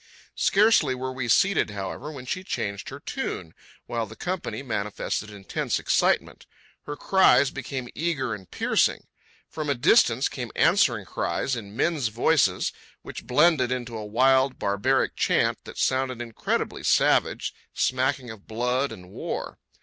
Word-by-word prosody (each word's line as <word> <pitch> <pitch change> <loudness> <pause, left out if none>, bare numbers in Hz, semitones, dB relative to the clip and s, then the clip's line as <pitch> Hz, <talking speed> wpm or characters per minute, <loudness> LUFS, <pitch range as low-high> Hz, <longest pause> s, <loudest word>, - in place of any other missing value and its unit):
Scarcely 200 -10 +4
were 130 +1 -4
we 130 -2 -3
seated, 195 - +3
however, 105 +8 -5
when 135 -4 -9
she 185 +8 -3
changed 100 - -4
her - - -8
tune, 80 - -5 0.3
while 115 -2 -3
the 110 - -11
company 180 -4 -4
manifested 105 -2 -3
intense 100 -3 -3
excitement. - - 0 0.4
Her 145 - -4
cries 165 -6 +4
became 130 -1 -5
eager 145 -7 -1
and 95 -5 -9
piercing. - - +1 0.4
From 155 -2 -5
a 140 - +2
distance 120 - +4
came - - -6
answering - - +3
cries, 135 - -2
in 105 -3 -8
men's 150 -3 +1
voices, 115 - +2 0.3
which - - -9
blended 135 -1 +3
into 120 -2 -3
a 110 - -5
wild, 130 +5 +3
barbaric 115 +7 +1
chant - - +1
that - - -10
sounded 130 -2 0
incredibly 115 -2 -3
savage, - - +2 0.2
smacking 130 -1 0
of 110 -3 -13
blood 125 +4 0
and 90 0 -11
war. - - -5
130 Hz, 140 wpm, -25 LUFS, 110-140 Hz, 0.4 s, Scarcely